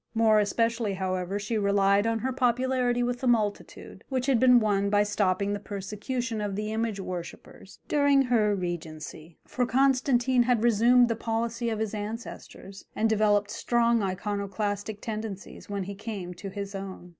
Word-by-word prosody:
More 220 -1 +4
especially, 230 0 0
however, 185 0 -2
she 210 +2 -2
relied 200 +1 +3
on 230 0 +1
her 260 +4 -2
popularity 250 -1 +1
with 245 0 -2
the 260 - -2
multitude, 215 -4 -1
which 260 -2 -1
had 265 -4 +3
been 250 0 +6
won 200 -2 +1
by 205 0 +3
stopping 200 -1 0
the 205 - -3
persecution 210 +4 -4
of 205 -2 -3
the 210 +1 -3
image 220 -2 -2
worshippers 180 -2 -8
during 285 -2 +3
her 220 -5 +2
regency, 165 -3 -6
for 250 -1 -1
Constantine 260 -1 +3
had 240 -2 +2
resumed 240 +2 +5
the 230 - -1
policy 230 +1 -2
of 220 - -2
his 220 -1 -3
ancestors 210 -2 -7
and 220 +1 +1
developed 210 -1 +2
strong 235 0 +1
Iconoclastic 205 +2 -3
tendencies 215 -3 -6
when 200 -1 -2
he 200 +2 -6
came 200 -3 -6
to 195 +3 -8
his 200 +1 -6
own. 195 -2 -7
215 Hz, 160 wpm, -27 LUFS, 200-240 Hz, -, been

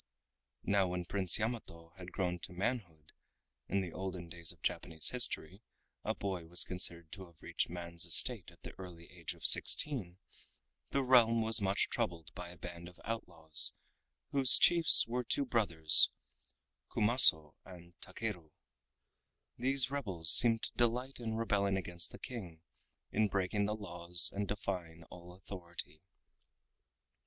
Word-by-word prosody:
Now 100 -2 -1
when 90 0 -6
Prince 95 0 +2
Yamato 105 -7 -8
had 90 -1 -13
grown 90 -2 -5
to 85 - -10
manhood 90 -6 -6 0.6
(in 100 +1 -3
the 90 -3 -8
olden 90 -2 -8
days 85 0 -5
of - - -18
Japanese 80 -2 -2
history, 105 -6 -2 0.4
a - - -4
boy 95 -4 -7
was 90 +2 +1
considered 85 -3 -5
to 95 -2 -11
have 85 -2 -26
reached - - -5
man's 85 -1 -7
estate 105 - +1
at 85 - -24
the - - -11
early 85 -3 -13
age 85 -3 -9
of - - -13
sixteen) 110 - +3 0.7
the 140 - -3
realm 115 -3 +2
was 110 0 +2
much 95 0 -1
troubled 85 -2 -6
by 90 -1 -10
a 90 - -15
band 85 0 -11
of 90 - -23
outlaws 85 -8 +1 0.6
whose 135 -2 +5
chiefs 170 -2 +5
were 125 +2 -5
two 140 +4 -1
brothers, 85 - +7 0.8
Kumaso 105 - +5
and 85 -2 -16
Takeru. 95 -9 -8 1.1
These 135 0 0
rebels 95 - -1
seemed 115 -2 +2
to - - -2
delight 125 +3 -3
in 110 -2 -6
rebelling 100 -3 -2
against 85 -2 -4
the - - -13
King, 95 -11 -11 0.5
in 110 0 -1
breaking 100 +1 -3
the 105 - -4
laws 90 -5 -1
and 100 0 -5
defying 90 -5 -7
all 90 0 -14
authority. 85 -4 -10
95 Hz, 145 wpm, -31 LUFS, 85-115 Hz, 1.1 s, brothers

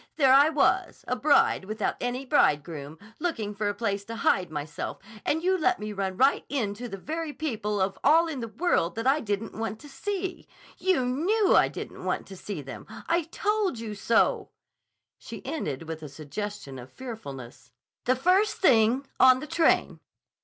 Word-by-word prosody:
"There 270 -4 +5
I 285 +3 +7
was, 305 - +1
a 250 - 0
bride 275 -6 +3
without 215 +1 -2
any 245 +2 -2
bridegroom, 150 - +1 0.2
looking 230 -12 -2
for 205 0 -1
a - - -1
place 205 -2 -2
to 230 - -6
hide 185 -5 +1
myself 150 -1 -5 0.3
and 320 +2 0
you 375 +1 +3
let 370 +1 +2
me 210 0 -5
run 190 -2 -3
right 270 +5 +4
into 235 -3 -2
the 195 - -6
very 320 - -4
people 215 -10 -2
of 190 0 -1
all 325 +4 +5
in 305 -5 -4
the 230 - -4
world 220 - 0
that 225 +2 -3
I 275 +3 +4
didn't 210 -3 -3
want 220 0 -4
to 295 - -11
see. 380 +5 -4 0.3
You 365 -9 +2
knew 370 - +2
I - - +6
didn't - - -8
want - - -2
to 195 - -8
see 185 -4 -6
them. 135 - -9 0.2
I 335 -1 +1
told 415 - 0
you 225 -2 -5
so," 225 +3 +2 0.7
she - - -9
ended 155 - -3
with 160 -1 -6
a 150 - -7
suggestion 150 0 -6
of 125 +1 -11
fearfulness, 140 - -9 0.3
"the 255 - +3
first 370 +10 +3
thing. 250 - +4
On 255 0 +7
the 305 - -6
train." 330 +1 +2
230 Hz, 180 wpm, -27 LUFS, 195-310 Hz, 0.7 s, I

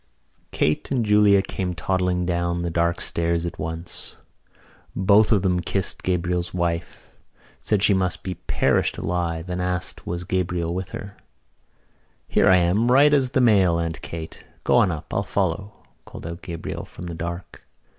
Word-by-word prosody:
Kate 75 - 0
and 125 -5 0
Julia 105 -2 +5
came 90 -2 -3
toddling 90 +1 0
down 85 0 -1
the 85 - -2
dark 85 +1 +1
stairs 85 0 0
at 85 - -6
once. 80 +2 -5 0.8
Both 100 +4 +4
of 100 -4 +3
them 90 -2 +2
kissed 95 +2 -2
Gabriel's 90 -1 -1
wife, 85 -2 -3 0.5
said 105 -2 +1
she 105 - +5
must 95 -2 0
be 95 - -3
perished - - 0
alive 85 0 -2
and 90 0 -3
asked 90 -1 -3
was 85 +1 -3
Gabriel 90 -2 -1
with 95 +1 -4
her. 100 0 -8 1.1
"Here - - +3
I 95 - +7
am 90 +6 +2
as - - +2
right 140 +4 +6
as 135 -3 +3
the 130 +1 +1
mail, 95 -8 +4
Aunt 85 -1 -3
Kate! 80 -1 -8 0.2
Go - - +1
on - - +5
up. 80 -1 -7
I'll 100 - +1
follow," 100 +2 -1 0.3
called - - -10
out 85 +1 -6
Gabriel 85 -2 -5
from 90 - -10
the 85 - -5
dark. 85 +1 -6
90 Hz, 165 wpm, -23 LUFS, 85-95 Hz, 1.1 s, I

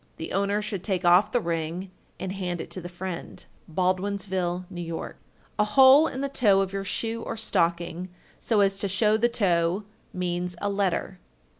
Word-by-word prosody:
The 160 - -6
owner 200 +2 +1
should 200 -3 -4
take 190 -3 -1
off 180 +5 +5
the 245 - +2
ring 170 +1 -3 0.3
and 190 0 -4
hand 180 -3 -3
it - - -7
to 185 - -4
the 175 - -7
friend. 180 0 -7 0.3
Baldwinsville, 185 0 -1
N.Y. 170 -1 -5
1394. - - -6 0.4
A - - +6
hole 265 +8 +7
in 265 - -5
the 280 - 0
toe 210 -8 +3
of 195 0 -3
your 195 0 -2
shoe 225 +3 -3
or 230 - -5
stocking, 175 -3 0 0.3
so 220 -4 +2
as 195 0 +2
to 200 - 0
show 210 +3 +2
the 235 +2 +2
toe, 180 -3 +1 0.3
means 180 0 -2
a 205 - -1
letter. 190 -1 -1
190 Hz, 180 wpm, -26 LUFS, 175-210 Hz, 0.4 s, hole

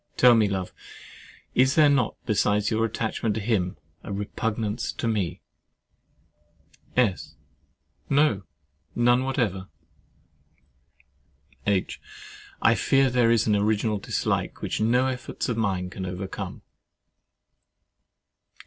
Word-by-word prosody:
Tell 125 -1 +7
me, 110 -2 +4
love, 95 -2 -3 0.8
is 130 +1 +3
there 155 -2 +6
not, 135 -5 +2
besides 105 0 +1
your 110 +1 +2
attachment 110 -1 -2
to - - -1
him, 100 -5 -1 0.3
a - - -7
repugnance 105 +2 -2
to 115 - -3
me? 105 -6 -1 1.6
S. 115 -7 +1 0.7
No, 140 -8 +3 0.5
none 120 +1 +3
whatever. 105 -8 -1 2.0
H. 100 -2 0 0.6
I - - +6
fear 135 -1 +2
there 120 -2 +3
is 115 -1 +3
an 105 - +2
original 105 +1 +1
dislike, - - -2
which - - -2
no 125 +4 +3
efforts 130 -1 -3
of 120 - 0
mine 95 -5 -1
can 95 -1 -5
overcome. 90 +1 -6
110 Hz, 110 wpm, -25 LUFS, 100-125 Hz, 2.0 s, Tell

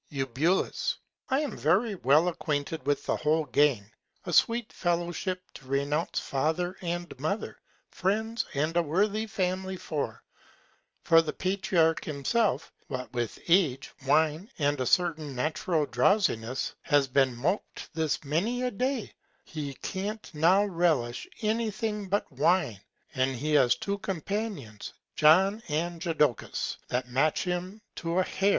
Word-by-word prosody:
Eu. 135 -2 -2 1.0
I 270 +2 +2
am 285 -7 -3
very 195 +9 +2
well 155 -1 +4
acquainted 150 -3 -2
with 145 - +1
the - - +1
whole 155 +1 +1
Gang. 130 -7 +2 0.3
A 175 - -3
sweet 230 +6 +3
Fellowship 175 +1 -1
to 135 - -13
renounce 140 +4 0
Father 160 +6 -1
and 175 -3 -3
Mother, 160 +9 -3 0.3
Friends, 220 +5 0
and 155 +4 0
a 175 - +5
worthy 205 +7 0
Family 190 -2 -2
for! 150 -4 -4 0.8
For 165 -1 +6
the 155 -2 -3
Patriarch 180 -4 +1
himself, 155 - 0
what 130 -2 -5
with 120 -2 -2
Age, 165 -7 +3 0.2
Wine, 160 - +2
and 145 -2 +1
a 130 - 0
certain 160 -5 +1
natural 155 +3 0
Drowsiness, 125 - +1
has 145 -2 +3
been 130 -1 +2
mop'd 155 - -2
this 160 -2 -1
many 195 - 0
a 250 - 0
Day, 250 +2 -2 0.3
he 145 -4 -6
can't 205 +2 -4
now 180 +7 +4
relish 165 -11 0 0.2
any 220 +1 +1
Thing 210 -1 -3
but 200 +2 0
Wine; 145 - +1 0.3
and 130 -1 +1
he 150 +5 -2
has 125 -4 +5
two 200 0 -3
Companions, 195 - -4 0.2
John 190 +8 +5
and 165 +2 -2
Jodocus, 150 - 0
that 125 0 -1
match 135 +5 +1
him 185 +4 -4
to 170 +1 -2
a 185 - +4
Hair. 195 +2 0
165 Hz, 140 wpm, -28 LUFS, 145-195 Hz, 1.0 s, For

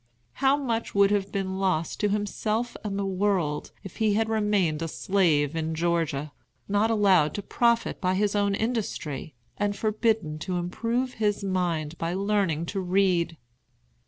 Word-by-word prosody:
How 275 +1 +4
much 230 -7 -2
would 200 0 +5
have 200 -1 0
been 190 -1 -2
lost 180 -4 0
to 210 - +2
himself 215 +3 -1
and 200 -2 -3
the 200 - -1
world 185 -6 0
if 195 - -10
he 215 -2 +2
had 220 +1 +1
remained 205 -8 +1
a 165 - -1
slave 155 0 +1
in 160 0 -2
Georgia, 160 -3 0 0.4
not 205 +2 +2
allowed 195 -8 +3
to 205 - -4
profit 235 +2 +1
by 185 -1 +1
his 205 +1 +1
own 200 -1 +2
industry, 200 - -3 0.2
and 205 -1 0
forbidden 215 -7 0
to 180 +3 -3
improve 230 +8 -1
his 205 -1 +1
mind 170 -4 -1
by 165 +2 -1
learning 195 -5 0
to 195 - -1
read! 180 -3 +1
195 Hz, 160 wpm, -26 LUFS, 170-210 Hz, 0.4 s, would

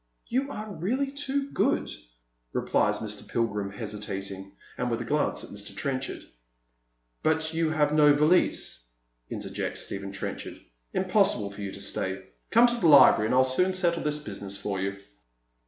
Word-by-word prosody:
" - - -39
You 275 +2 +1
are 215 -4 -6
really 250 - -1
too 280 0 -2
good," - - +1 0.6
replies - - +1
Mr. - - -6
Pilgrim, 105 -4 -1
hesitating, 100 -2 -5 0.2
and 125 - -2
with 115 - -1
a 120 - -4
glance 150 +5 0
at - - -10
Mr. 100 0 -7
Trenchard. 135 -1 -3 0.5
" - - -47
But 160 0 +1
you 165 -1 +1
have 150 -1 +1
no 150 -1 +6
valise," 150 - +2 0.4
intei - - -5
jects - - -2
Stephen 100 0 -4
Trenchard, 100 - -5 0.2
" - - -45
im - - +1
possible 100 -1 +3
for 100 +1 -9
you 100 -1 -4
to 100 - -8
stay. 95 -1 -2 0.3
Come 230 +2 +6
to 240 0 +1
the 180 - +2
library, 140 -7 +7
and 125 - +1
I'll 130 - +6
soon 180 +9 +1
settle 175 -2 +2
tliis 150 0 -1
business 100 -5 -5
for 100 -1 -3
you." 100 +1 -2
130 Hz, 175 wpm, -27 LUFS, 100-165 Hz, 0.6 s, library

